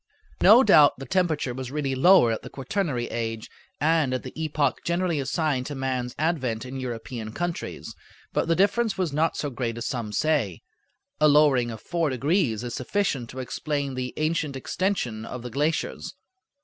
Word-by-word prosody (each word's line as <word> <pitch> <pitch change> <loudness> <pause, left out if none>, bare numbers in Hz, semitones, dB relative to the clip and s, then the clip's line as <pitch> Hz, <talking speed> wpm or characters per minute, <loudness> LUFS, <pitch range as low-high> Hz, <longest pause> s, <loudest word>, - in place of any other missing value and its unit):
No 240 +5 +8
doubt 155 - +6
the 135 - -7
temperature 165 -8 0
was 130 0 -6
really 140 -1 -2
lower 130 -2 +6
at 110 - -2
the - - -9
quaternary 140 -4 -2
age 115 -1 -4 0.3
and 155 -4 +2
at 130 - -4
the 130 - -8
epoch 150 -4 0
generally 170 -2 0
assigned 135 -1 -1
to 145 - -5
man's 130 -2 -2
advent 130 -8 -1
in 130 +1 -6
European 115 -2 -5
countries, 175 +2 -4 0.4
but - - 0
the 165 - +3
difference 205 +3 +2
was 180 -6 -1
not 160 +3 +1
so 145 - -2
great 120 -2 -3
as 115 - -4
some 115 -3 -3
say. 115 - 0 0.6
A 150 - +5
lowering 145 -5 +4
of 110 -2 -7
four 170 -3 -1
degrees 130 - 0
is 120 -1 -5
sufficient 135 - -1
to 130 - -10
explain 140 +2 -3
the 130 0 -4
ancient 155 -2 -1
extension 135 - -2
of 120 +1 -7
the 125 - -6
glaciers. 150 +5 -2
140 Hz, 175 wpm, -25 LUFS, 125-160 Hz, 0.6 s, No